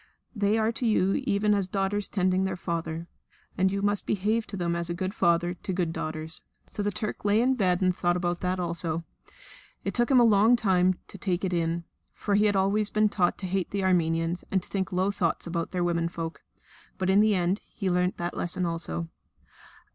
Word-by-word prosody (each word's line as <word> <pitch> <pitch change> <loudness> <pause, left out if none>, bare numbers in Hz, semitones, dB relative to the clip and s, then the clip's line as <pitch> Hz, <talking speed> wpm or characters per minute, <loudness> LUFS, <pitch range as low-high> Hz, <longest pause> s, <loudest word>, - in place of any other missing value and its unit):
They 205 +1 +2
are 220 0 +2
to 235 +2 -3
you 195 -3 +3
even 210 -1 +2
as 200 -2 +1
daughters 195 +1 -1
tending 185 -1 +1
their 190 - -1
father; 170 -2 -3 0.5
and 190 +1 +2
you 200 0 -2
must 205 0 0
behave 215 +3 0
to 200 - -6
them 170 -1 -1
as 170 0 -2
a 170 - -2
good 185 +2 -3
father 175 -2 +2
to 185 +2 -5
good 175 -3 -1
daughters." 155 0 -4 0.3
So - - -5
the 205 - +1
Turk 210 +2 -4
lay 205 +1 +3
in 255 +3 +3
bed 185 -6 +1
and 185 -1 +2
thought 175 0 +1
about 175 -1 -1
that 180 0 -1
also. 170 -1 -2 0.8
It - - -2
took 240 -1 +1
him 265 -2 +6
a - - +6
long 220 +1 +5
time 185 -5 +3
to 200 - -10
take 185 0 -1
it 185 - -2
in, 170 0 0 0.3
for 205 - -2
he 210 +1 +4
had 205 -1 +2
always 200 +2 +2
been 215 0 +2
taught 180 -4 +1
to 190 - -6
hate 185 0 -1
the 200 -1 -2
Armenians 165 -1 +1
and 190 -2 0
to - - -14
think 190 -1 -2
low 185 +2 +1
thoughts 175 -5 -1
about 170 -1 -2
their 180 -1 -1
womenfolk. 170 -1 -2 0.6
But 190 0 +1
in 200 +2 +6
the 215 -1 +4
end 180 +3 0
he 195 - -4
learnt 180 0 +1
that 175 0 -3
lesson 180 +1 -1
also. 165 0 -3
185 Hz, 215 wpm, -27 LUFS, 175-205 Hz, 0.8 s, him